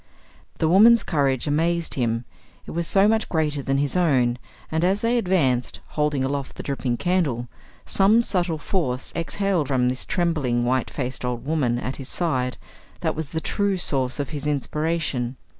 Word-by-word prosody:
The 160 - +1
woman's 220 +7 +6
courage 135 -4 0
amazed 165 +3 0
him; 115 -2 -1 0.4
it - - -8
was 170 0 -1
so 195 +1 +4
much 220 0 +1
greater 150 -3 0
than 135 0 0
his 140 +3 0
own; 130 -9 +2 0.3
and, 160 +1 0
as 190 +3 +2
they 230 +1 +1
advanced, 165 - +1
holding 150 -3 0
aloft 140 0 -3
the - - -7
dripping 125 -3 -2
candle, 150 -10 0 0.4
some 210 +4 +4
subtle 175 -6 0
force 145 -6 -2
exhaled 175 -2 0
from 125 -2 +2
this 130 +1 -2
trembling, 150 -9 0
white 130 +1 0
faced 130 -2 -4
old 125 -1 -3
woman 140 -6 +1
at 130 +2 -4
his 135 - -5
side 130 -7 0 0.4
that - - 0
was 155 -2 -4
the 160 - -2
true 200 +1 0
source 135 -6 -1
of 140 - -2
his 150 -1 -4
inspiration. 145 -3 -1
150 Hz, 170 wpm, -23 LUFS, 130-175 Hz, 0.4 s, woman's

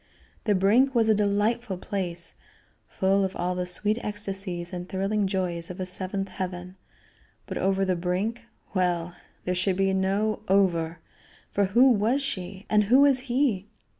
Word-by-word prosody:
The 210 -2 +3
brink 235 +8 +3
was 225 -2 +3
a - - +6
delightful 210 +1 0
place, 175 -3 -4 0.5
full 195 +1 +1
of 190 0 -2
all 180 +1 -1
the 180 0 -3
sweet 210 +5 0
ecstasies 195 -4 -4
and 180 0 -6
thrilling 195 +2 0
joys 180 -3 -2
of 180 +1 -8
a 185 - -2
seventh 190 +1 0
heaven, 180 -1 -5 0.7
but - - -5
over 195 0 +1
the 185 -1 +1
brink 185 +7 -2 0.3
well! 175 -2 0 0.3
there 180 - 0
should 180 +1 +1
be 195 0 +2
no 200 +3 0
"over," 175 -4 +2 0.5
for 200 - +2
who 245 +7 +5
was 235 +5 +2
she? 190 -6 -5
And 210 -1 +3
who 255 +7 +5
was 280 -2 +5
he? 240 -7 +1
195 Hz, 160 wpm, -26 LUFS, 180-210 Hz, 0.7 s, a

